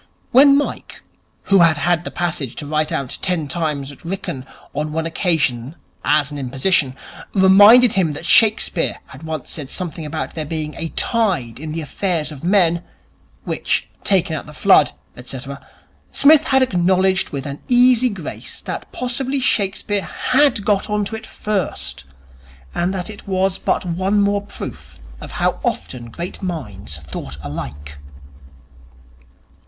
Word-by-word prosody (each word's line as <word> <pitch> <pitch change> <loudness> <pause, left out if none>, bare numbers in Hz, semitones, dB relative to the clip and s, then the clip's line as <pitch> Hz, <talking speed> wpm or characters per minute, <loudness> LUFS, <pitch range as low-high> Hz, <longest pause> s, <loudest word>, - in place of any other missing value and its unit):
When 275 +2 +7
Mike, 290 - -4 0.4
who 195 -1 +4
had 165 -3 +5
had 175 +3 +1
the - - -3
passage 165 -8 -3
to 150 - -5
write 155 +1 -1
out 135 -2 -3
ten 175 -5 -1
times 145 -3 -2
at 140 - -16
Wrykyn 165 -7 -5 0.3
on 150 +1 -3
one 160 0 -1
occasion 155 -6 0 0.3
as 150 0 +2
an 145 - -5
imposition, 135 +1 +1 0.4
reminded 205 +5 +7
him 175 -6 +1
that 145 - -7
Shakespeare 210 -4 +3
had 130 - -13
once 160 -4 -5
said 145 -5 -6
something 170 -2 -4
about 155 +1 -4
there 160 - -3
being 155 0 -4
a 165 - -4
tide 180 - 0
in 155 +1 -6
the 165 +1 -3
affairs 160 0 -2
of 145 -1 -10
men, 175 -2 +3 0.6
which, - - -1
taken 180 -5 +2
at 150 - -6
the 150 - -11
flood, - - +5 0.3
&c., 130 - -6 0.7
Psmith 305 +2 +6
had 265 -1 +4
acknowledged 185 -3 +2
with 140 -2 -5
an 140 0 -6
easy 250 0 +5
grace 190 -8 -7
that - - -6
possibly 260 +2 -2
Shakespeare 205 -3 0
had 255 -1 +2
got 205 -1 +1
on 210 -1 0
to 220 - -4
it 220 0 -8
first, 205 - -3 0.7
and 175 +2 0
that 190 +2 -4
it 205 - -13
was 190 0 0
but - - 0
one 185 +4 0
more 200 0 +2
proof 205 - -9 0.2
of - - -9
how - - 0
often 115 +9 -3
great 170 +9 -7
minds 105 - -5
thought 70 -1 -8
alike. 70 0 -7
170 Hz, 150 wpm, -19 LUFS, 145-200 Hz, 0.7 s, When